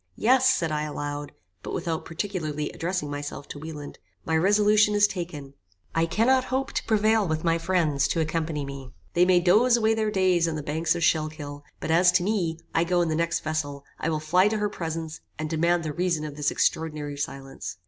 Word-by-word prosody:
"Yes," 260 +3 +4
said 180 -12 +1
I 150 0 -1
aloud, 145 -1 -4 0.3
but - - -5
without 165 -2 -3
particularly 160 -5 -3
addressing 170 -4 -3
myself 145 0 -6
to 145 - -7
Wieland, 150 -2 -8 0.3
"my 160 - 0
resolution 210 +4 +4
is 205 0 +6
taken. 165 -8 -5 0.4
I 165 0 +2
cannot 255 +8 +3
hope 265 +1 -2
to - - -1
prevail 220 -1 +3
with 155 -1 -2
my 165 -1 +2
friends 165 -5 +1
to 165 - -1
accompany 160 -2 -1
me. 135 -2 -8 0.2
They 175 +1 +4
may 180 -1 +5
doze 215 +8 +4
away 220 -1 +2
their 220 -1 0
days 185 -4 +2
on 165 - -2
the 150 - -4
banks 160 +3 0
of 170 - -2
Schuylkill, 155 -3 -1 0.2
but - - -3
as 175 +2 +5
to 180 -1 +3
me, 180 -5 0 0.2
I 165 - +3
go 175 +1 +1
in 170 - -1
the 155 - 0
next 165 +1 0
vessel; 145 -3 -3
I 165 - -1
will 155 -1 0
fly 180 +5 +3
to 215 +1 0
her 210 0 0
presence, 160 -4 -5 0.2
and 155 +1 -3
demand 170 +2 +2
the 155 -2 -3
reason 170 -3 0
of 150 -2 -7
this 145 -1 0
extraordinary 150 -2 -1
silence." 135 -6 -6
165 Hz, 205 wpm, -26 LUFS, 150-185 Hz, 0.4 s, is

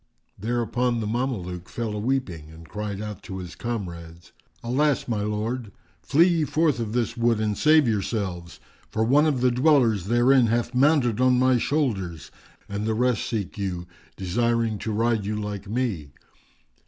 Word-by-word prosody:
Thereupon 120 +2 0
the 110 - -3
Mameluke 105 -7 -3
fell 115 -3 -3
a 105 - -3
weeping 105 - -2
and 80 +1 -13
cried 105 +1 -5
out 105 -2 -6
to 95 - -7
his 90 -1 -7
comrades, 85 -8 -6 0.3
"Alas, 140 +4 +1
my 110 -4 -1
lord! 105 +2 -3 0.3
Flee 160 - +4
ye 170 -3 +2
forth 150 -1 +1
of 110 -2 -3
this 120 -1 -1
wood 115 -2 +2
and 105 -1 0
save 155 0 +4
yourselves, 95 -5 -2 0.3
for 110 - 0
one 145 +7 +4
of 140 -5 0
the 125 0 +4
dwellers 125 - +3
therein 120 +3 +4
hath 120 +2 0
mounted 125 -3 +3
on 130 -1 +4
my 130 0 +3
shoulders, 100 - -2 0.4
and 100 +2 -3
the 110 - 0
rest 125 0 +1
seek 105 -2 -4
you, 90 -3 -3 0.3
desiring 115 +3 0
to 110 - -3
ride 115 0 +1
you 105 +2 -2
like 105 -1 -5
me." 110 - -2
115 Hz, 165 wpm, -25 LUFS, 100-125 Hz, 0.4 s, Flee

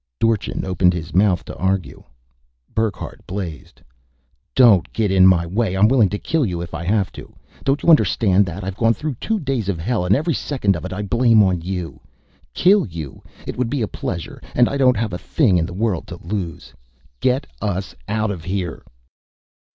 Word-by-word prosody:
Dorchin 115 -4 0
opened 90 -1 +2
his 85 0 -6
mouth 95 -1 +2
to - - -8
argue. 95 -1 -2 0.7
Burckhardt 110 -4 -3
blazed: 90 -7 -7 0.7
"Don't 115 -9 +5
get 105 -3 0
in 95 -1 +6
my 85 -2 +4
way! 95 +2 -1
I'm 105 +3 +5
willing 115 -5 +4
to 105 - -3
kill 160 +7 0
you 90 -7 -2
if 85 0 -7
I 80 +1 -4
have 95 -1 +1
to. - - -12 0.3
Don't 135 +2 0
you - - +2
understand 100 - +4
that? 95 +3 -6
I've 95 +1 -5
gone 115 0 +3
through 150 +6 -3
two 220 -1 -1
days 135 - -2
of 95 - -1
hell 95 +4 -1
and 90 +3 +3
every 155 +4 0
second 125 -10 0
of 80 - -6
it - - -6
I 100 +2 -4
blame 115 +1 +4
on 90 -3 +1
you. 90 -1 -5 0.6
Kill 195 - +4
you? 80 -7 -8 0.2
It - - -6
would 125 -2 0
be 140 -3 -1
a - - -1
pleasure 90 -4 -5
and 120 -1 +5
I - - -3
don't 130 -4 +3
have 110 -3 -2
a 90 - -4
thing 105 - +2
in 80 - -1
the - - -9
world 95 -2 -1
to 90 - -8
lose! 90 -4 -5 0.5
Get 130 +3 +1 0.2
us 95 -2 -3
out 110 0 0
of 90 -5 -6
here!" 90 -1 -3
100 Hz, 195 wpm, -20 LUFS, 90-115 Hz, 0.7 s, in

